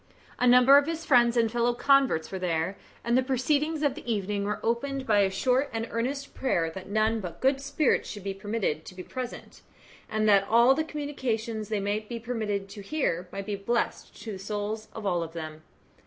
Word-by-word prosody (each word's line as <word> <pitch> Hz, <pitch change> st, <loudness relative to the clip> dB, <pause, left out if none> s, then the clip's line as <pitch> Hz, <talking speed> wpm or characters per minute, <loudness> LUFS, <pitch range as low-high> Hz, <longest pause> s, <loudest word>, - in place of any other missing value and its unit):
A 250 Hz, -, +3 dB
number 250 Hz, +3 st, +8 dB
of 285 Hz, -, -3 dB
his 330 Hz, 0 st, -3 dB
friends 240 Hz, -4 st, +4 dB
and 230 Hz, -2 st, +3 dB
fellow 240 Hz, 0 st, +1 dB
converts 270 Hz, -, +3 dB
were 190 Hz, -, -4 dB
there, 170 Hz, +1 st, -1 dB, 0.3 s
and 235 Hz, 0 st, +1 dB
the 260 Hz, -, +5 dB
proceedings 290 Hz, +4 st, 0 dB
of 285 Hz, -3 st, +2 dB
the 265 Hz, -5 st, -5 dB
evening 200 Hz, -1 st, -1 dB
were 210 Hz, +1 st, -2 dB
opened 265 Hz, +4 st, -1 dB
by 210 Hz, -4 st, +3 dB
a 195 Hz, -1 st, +4 dB
short 255 Hz, +8 st, +1 dB
and 225 Hz, 0 st, -3 dB
earnest 270 Hz, +5 st, -3 dB
prayer 170 Hz, -11 st, 0 dB
that 190 Hz, +3 st, -9 dB
none 215 Hz, +2 st, +1 dB
but 175 Hz, -4 st, -7 dB
good 270 Hz, +1 st, +2 dB
spirits 285 Hz, +1 st, +1 dB
should 205 Hz, -3 st, -7 dB
be 195 Hz, 0 st, -3 dB
permitted 195 Hz, -6 st, -2 dB
to 185 Hz, -, -10 dB
be 180 Hz, -, -7 dB
present, 255 Hz, +3 st, -7 dB, 0.5 s
and 215 Hz, 0 st, 0 dB
that 200 Hz, -1 st, +5 dB
all 235 Hz, +3 st, +6 dB
the 315 Hz, +3 st, 0 dB
communications 240 Hz, -8 st, -3 dB
they 215 Hz, -2 st, 0 dB
might 205 Hz, +2 st, -2 dB
be 235 Hz, -, -4 dB
permitted 215 Hz, -4 st, -3 dB
to 205 Hz, -, -9 dB
hear 195 Hz, -, -1 dB
might 195 Hz, 0 st, -5 dB
be 205 Hz, 0 st, -2 dB
blessed 235 Hz, +4 st, -2 dB
to 225 Hz, -, -5 dB
the 190 Hz, -, -6 dB
souls 210 Hz, +2 st, -4 dB
of 220 Hz, -, -6 dB
all 175 Hz, -3 st, +1 dB
of 165 Hz, -1 st, -6 dB
them. 155 Hz, -2 st, -7 dB
225 Hz, 210 wpm, -27 LUFS, 200-260 Hz, 0.5 s, number